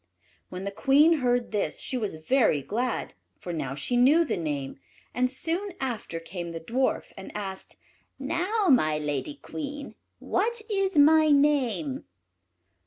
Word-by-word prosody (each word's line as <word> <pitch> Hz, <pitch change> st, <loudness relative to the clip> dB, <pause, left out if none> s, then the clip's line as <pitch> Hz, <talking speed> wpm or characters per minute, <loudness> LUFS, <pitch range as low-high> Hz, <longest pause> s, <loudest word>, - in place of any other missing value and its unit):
'" -, -, -37 dB
When 185 Hz, +1 st, -6 dB
the 200 Hz, -, -3 dB
Queen 285 Hz, +9 st, +4 dB
heard 245 Hz, -2 st, 0 dB
this 200 Hz, -8 st, -2 dB
she -, -, -3 dB
was 215 Hz, -8 st, -2 dB
very 240 Hz, -, +3 dB
glad, 240 Hz, -, -2 dB, 0.2 s
for 175 Hz, -, -6 dB
now 135 Hz, -5 st, -3 dB
she 150 Hz, -, -2 dB
knew 285 Hz, +8 st, +5 dB
the -, -, -1 dB
name; 145 Hz, -5 st, -4 dB, 0.3 s
and 250 Hz, 0 st, +1 dB
soon 340 Hz, +9 st, -3 dB
after 235 Hz, -10 st, -4 dB
came 170 Hz, 0 st, -6 dB
the 165 Hz, -, -5 dB
Dwarf, 250 Hz, +10 st, -1 dB
and 190 Hz, -, -9 dB
asked, 195 Hz, -2 st, -7 dB, 0.4 s
"Now, 350 Hz, +10 st, -1 dB
my 155 Hz, -, +3 dB
lady 150 Hz, -, -3 dB
Queen, 290 Hz, -1 st, -7 dB, 0.2 s
what 470 Hz, +1 st, -1 dB
is 390 Hz, -3 st, 0 dB
my 310 Hz, +2 st, +6 dB
name?" 280 Hz, -1 st, +2 dB
255 Hz, 150 wpm, -27 LUFS, 180-295 Hz, 0.4 s, my